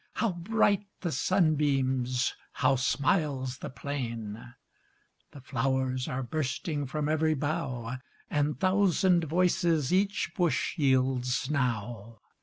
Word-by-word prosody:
How 230 - 0
bright 200 +3 +1
the 175 - -2
sunbeams! 135 -8 +1 0.2
How 135 0 +2
smiles 135 0 0
the - - -6
plain! 120 -4 -5 0.7
The 140 - -12
flow'rs 130 0 -1
are 130 +1 -2
bursting 145 +1 -2
From 150 +2 -2
ev'ry 155 0 +2
bough, 130 -4 -3 0.3
And 145 0 0
thousand 185 -2 +3
voices 170 -2 +2
Each 195 -1 +1
bush 170 -7 0
yields 130 -2 +1
now. 115 -4 -2
140 Hz, 105 wpm, -29 LUFS, 130-165 Hz, 0.7 s, thousand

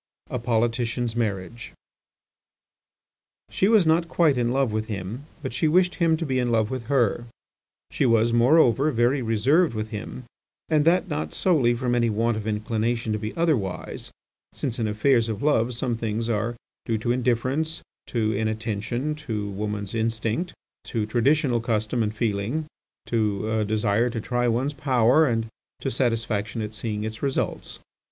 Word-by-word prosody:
IV. - - -1
A - - -4
POLITICIAN'S 115 0 0
MARRIAGE 110 0 -3 1.8
She 190 - +2
was 215 -4 +5
not 165 +1 +2
quite 160 -5 +3
in 120 -1 +1
love 130 -2 +1
with 110 0 -2
him, 110 +7 -5 0.2
but 130 - -4
she 135 +6 +1
wished 180 +3 +3
him 165 -1 +4
to 165 - -3
be 130 -3 0
in 120 -1 0
love 110 -1 +1
with 130 -3 -4
her. 120 -3 +1 0.7
She 135 - +1
was, 115 0 +3
moreover, 130 +2 +4
very 125 +1 +2
reserved 125 +7 +2
with 110 0 -3
him, 110 +4 -6 0.5
and 155 -2 +3
that 180 +4 +3
not 150 -3 -3
solely 135 -10 +3
from 120 0 -1
any 120 -1 +2
want 115 +2 +1
of 110 0 -5
inclination 110 +1 -1
to 105 - -2
be 110 +6 -5
otherwise, 135 - -1 0.5
since 125 -2 -3
in 110 - 0
affairs 115 +2 +2
of 110 +1 -4
love 125 -5 +2
some 120 0 -1
things 115 0 -2
are 115 +2 -1 0.3
due 115 - +1
to 115 +3 -1
indifference, 130 +6 0 0.2
to 110 -3 0
inattention, 110 +5 -2
to 110 -9 -4
woman's 105 0 -4
instinct, 115 +8 -1 0.3
to 110 -3 -2
traditional 125 +3 +2
custom 115 +1 -1
and 105 -1 -1
feeling, 110 +7 -1 0.4
to 110 -2 0
a 110 -1 +1
desire 105 +2 +1
to 115 -1 -4
try 120 +2 0
one's 125 +5 0
power, 130 +2 +3
and 115 -2 0 0.3
to - - -2
satisfaction 115 -3 -1
at 105 0 -5
seeing 105 -1 -3
its 110 +1 -5
results. 135 -2 -2
115 Hz, 160 wpm, -25 LUFS, 110-135 Hz, 1.8 s, was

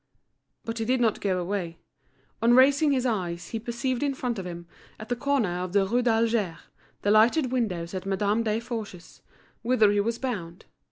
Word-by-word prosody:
But 230 0 -4
he 225 - -1
did 255 +2 +1
not 225 -3 +1
go 190 -2 0
away. 175 -2 -3 0.6
On 235 +1 +5
raising 285 +3 +5
his 260 -2 +1
eyes 180 -7 -2
he 225 - -3
perceived 240 +2 -3
in 285 -2 0
front 245 -4 -3
of 185 - -5
him, 170 -1 -7 0.3
at 215 +1 -9
the 245 - 0
corner 240 -9 0
of 180 0 -4
the 200 -1 +3
Rue 240 +6 +1
d'Alger, 225 -6 +1 0.5
the 205 - +2
lighted 240 +6 +4
windows 185 -9 -2
at 190 0 -5
Madame 205 +3 +1
Desforges's, 220 -4 -5 0.4
whither 230 -3 +3
he 205 - +1
was 230 +3 0
bound. 190 -10 -5
225 Hz, 180 wpm, -26 LUFS, 190-245 Hz, 0.6 s, On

